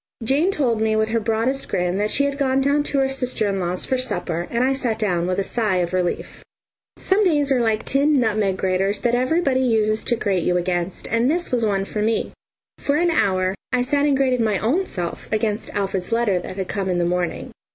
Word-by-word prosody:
Jane 280 Hz, +10 st, +2 dB
told 245 Hz, -, 0 dB
me 220 Hz, 0 st, +2 dB
with 220 Hz, 0 st, +1 dB
her 230 Hz, +1 st, +1 dB
broadest 230 Hz, +5 st, -1 dB
grin 180 Hz, +1 st, 0 dB
that 210 Hz, +1 st, 0 dB
she 280 Hz, -, +2 dB
had 280 Hz, 0 st, -2 dB
gone 265 Hz, -1 st, +2 dB
down 280 Hz, +2 st, +2 dB
to 280 Hz, -, -2 dB
her 270 Hz, -1 st, +3 dB
sister 255 Hz, -5 st, -1 dB
in 195 Hz, -1 st, -1 dB
law's 180 Hz, 0 st, -2 dB
for 260 Hz, -, 0 dB
supper, 175 Hz, -9 st, -2 dB
and 235 Hz, +1 st, 0 dB
I 265 Hz, +1 st, +2 dB
sat 245 Hz, -5 st, -1 dB
down 180 Hz, -6 st, 0 dB
with 185 Hz, -, -1 dB
a 195 Hz, -, +1 dB
sigh 215 Hz, -2 st, 0 dB
of 180 Hz, -1 st, -1 dB
relief. 180 Hz, -1 st, -2 dB, 0.5 s
Some 395 Hz, +3 st, +2 dB
days 295 Hz, -7 st, +2 dB
are 260 Hz, -, +3 dB
like 220 Hz, -2 st, 0 dB
tin 280 Hz, +3 st, +2 dB
nutmeg 210 Hz, -5 st, +1 dB
graters 190 Hz, +2 st, 0 dB
that 240 Hz, -1 st, +1 dB
everybody 260 Hz, +2 st, +1 dB
uses 220 Hz, -3 st, +1 dB
to 240 Hz, -, +2 dB
grate 200 Hz, -5 st, 0 dB
you 180 Hz, +2 st, +1 dB
against, 175 Hz, 0 st, -2 dB
and 230 Hz, +3 st, +2 dB
this 345 Hz, +3 st, -1 dB
was 245 Hz, -2 st, +1 dB
one 195 Hz, -2 st, 0 dB
for 210 Hz, -, -4 dB
me. 220 Hz, +1 st, 0 dB, 0.5 s
For 285 Hz, -, 0 dB
an 340 Hz, +2 st, +2 dB
hour 185 Hz, -, +1 dB, 0.2 s
I 250 Hz, -1 st, +2 dB
sat 285 Hz, +2 st, +1 dB
and 280 Hz, -2 st, +2 dB
grated 255 Hz, -3 st, +2 dB
my 215 Hz, -3 st, +1 dB
own 315 Hz, -, 0 dB
self 175 Hz, -2 st, -5 dB
against 215 Hz, 0 st, -1 dB
Alfred's 195 Hz, -2 st, -2 dB
letter 230 Hz, -5 st, +2 dB
that 175 Hz, -, -7 dB
had 190 Hz, -1 st, -3 dB
come 195 Hz, -2 st, -3 dB
in 180 Hz, -, 0 dB
the 175 Hz, -, +1 dB
morning. 175 Hz, 0 st, -2 dB
220 Hz, 225 wpm, -22 LUFS, 190-265 Hz, 0.5 s, her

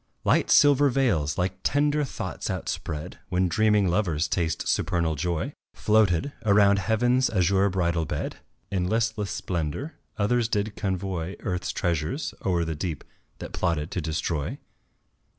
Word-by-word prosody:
Light -, -, +2 dB
silver 145 Hz, -1 st, +6 dB
veils, 105 Hz, -, +1 dB
like 90 Hz, +1 st, -1 dB
tender 145 Hz, +1 st, +2 dB
thoughts 95 Hz, -, -5 dB
outspread 75 Hz, -1 st, -4 dB
When 90 Hz, 0 st, +2 dB
dreaming 105 Hz, +2 st, +3 dB
lovers 85 Hz, -4 st, +1 dB
taste 80 Hz, 0 st, -1 dB
supernal 85 Hz, -3 st, +1 dB
joy, 85 Hz, +2 st, -2 dB, 0.2 s
Floated 105 Hz, -, +2 dB
around 100 Hz, -1 st, +5 dB
Heaven's 120 Hz, +5 st, +2 dB
azure 100 Hz, -1 st, +2 dB
bridal 85 Hz, -3 st, 0 dB
bed -, -, -4 dB, 0.3 s
In 90 Hz, -2 st, 0 dB
listless 110 Hz, -2 st, 0 dB
splendour; 85 Hz, -, -3 dB, 0.2 s
others 115 Hz, +3 st, +2 dB
did 105 Hz, -2 st, -1 dB
convoy 95 Hz, -2 st, -3 dB
Earth's 90 Hz, -1 st, -2 dB
treasures 85 Hz, -, -2 dB
o'er 85 Hz, -3 st, +1 dB
the 80 Hz, -, -2 dB
deep 80 Hz, -2 st, -4 dB, 0.3 s
that -, -, -8 dB
plotted 80 Hz, -2 st, -1 dB
to 90 Hz, -, -2 dB
destroy. 80 Hz, -1 st, -2 dB
95 Hz, 135 wpm, -26 LUFS, 85-110 Hz, 0.3 s, silver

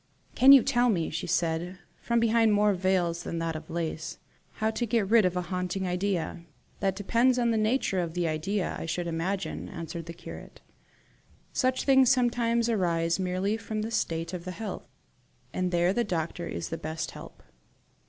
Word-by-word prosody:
"Can 265 Hz, +2 st, +7 dB
you 275 Hz, -4 st, +9 dB
tell 245 Hz, -2 st, +2 dB
me," 170 Hz, -7 st, 0 dB
she 160 Hz, -, -4 dB
said, 175 Hz, +1 st, -1 dB, 0.2 s
from 235 Hz, 0 st, +1 dB
behind 225 Hz, -1 st, +3 dB
more 205 Hz, 0 st, +4 dB
veils 180 Hz, -2 st, 0 dB
than 170 Hz, -, -4 dB
that 165 Hz, -1 st, -2 dB
of 155 Hz, 0 st, -8 dB
lace, 160 Hz, -2 st, -4 dB, 0.4 s
"how 220 Hz, 0 st, 0 dB
to 240 Hz, +1 st, -2 dB
get 220 Hz, -3 st, +1 dB
rid 225 Hz, -4 st, +6 dB
of 180 Hz, 0 st, 0 dB
a 180 Hz, -, -1 dB
haunting 180 Hz, +1 st, -2 dB
idea?" 180 Hz, -2 st, -1 dB, 0.4 s
"That 195 Hz, -2 st, 0 dB
depends 235 Hz, +6 st, +2 dB
on 240 Hz, -1 st, +2 dB
the 225 Hz, -, +1 dB
nature 215 Hz, -3 st, +1 dB
of 170 Hz, -1 st, -3 dB
the 175 Hz, -1 st, 0 dB
idea, 180 Hz, +5 st, -1 dB
I -, -, -5 dB
should 175 Hz, +2 st, -2 dB
imagine," 175 Hz, +4 st, -3 dB
answered 165 Hz, -1 st, -6 dB
the 170 Hz, -, -6 dB
curate. -, -, -11 dB, 0.9 s
"Such 255 Hz, -1 st, +1 dB
things 265 Hz, -2 st, +5 dB
sometimes 235 Hz, -2 st, +2 dB
arise 170 Hz, -6 st, +1 dB
merely 185 Hz, +3 st, 0 dB
from 220 Hz, -1 st, -4 dB
the 225 Hz, -, -4 dB
state 165 Hz, -5 st, -1 dB
of 175 Hz, -2 st, -5 dB
the 185 Hz, -, -6 dB
health, 210 Hz, +4 st, -6 dB, 0.7 s
and 185 Hz, -1 st, 0 dB
there 175 Hz, +1 st, +2 dB
the 240 Hz, -, +1 dB
doctor 170 Hz, -3 st, -3 dB
is -, -, -4 dB
the 165 Hz, -, -4 dB
best 155 Hz, 0 st, -4 dB
help." -, -, -12 dB
185 Hz, 185 wpm, -28 LUFS, 170-225 Hz, 0.9 s, you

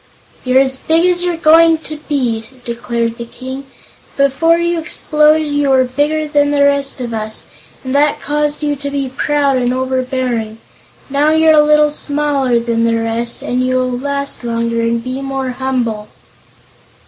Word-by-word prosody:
"You're 255 Hz, 0 st, +3 dB
as 265 Hz, -1 st, -1 dB
big 325 Hz, +5 st, +1 dB
as 355 Hz, -1 st, +2 dB
you're 350 Hz, -2 st, -1 dB
going 325 Hz, +1 st, +5 dB
to 310 Hz, -, -6 dB
be," 245 Hz, -6 st, -1 dB, 0.2 s
declared 235 Hz, -1 st, -3 dB
the 235 Hz, -, -5 dB
King. 260 Hz, +3 st, -8 dB, 0.5 s
"Before 280 Hz, +5 st, +3 dB
you 340 Hz, 0 st, 0 dB
exploded 310 Hz, -1 st, +2 dB
you 290 Hz, -1 st, 0 dB
were 260 Hz, -1 st, +4 dB
bigger 295 Hz, +5 st, -1 dB
than 290 Hz, -1 st, +2 dB
the 290 Hz, -1 st, +2 dB
rest 280 Hz, -1 st, +1 dB
of 240 Hz, -2 st, -5 dB
us, 220 Hz, 0 st, -5 dB, 0.4 s
and 260 Hz, 0 st, -4 dB
that 290 Hz, +1 st, +2 dB
caused 295 Hz, 0 st, -1 dB
you 295 Hz, -1 st, 0 dB
to 285 Hz, +1 st, -5 dB
be 280 Hz, -2 st, -3 dB
proud 285 Hz, -2 st, +1 dB
and 245 Hz, -1 st, 0 dB
overbearing. 255 Hz, -3 st, -2 dB, 0.5 s
Now 285 Hz, +2 st, +2 dB
you're 315 Hz, 0 st, +4 dB
a 305 Hz, -, +6 dB
little 300 Hz, 0 st, +4 dB
smaller 285 Hz, -4 st, 0 dB
than 230 Hz, 0 st, -1 dB
the 230 Hz, 0 st, +1 dB
rest, 230 Hz, +1 st, -1 dB
and 250 Hz, +1 st, -1 dB
you 255 Hz, 0 st, 0 dB
will 255 Hz, 0 st, 0 dB
last 280 Hz, +2 st, -4 dB
longer 230 Hz, 0 st, -1 dB
and 230 Hz, 0 st, -1 dB
be 255 Hz, +2 st, -4 dB
more 270 Hz, -1 st, -3 dB
humble." 245 Hz, -5 st, -2 dB
270 Hz, 170 wpm, -15 LUFS, 245-295 Hz, 0.5 s, a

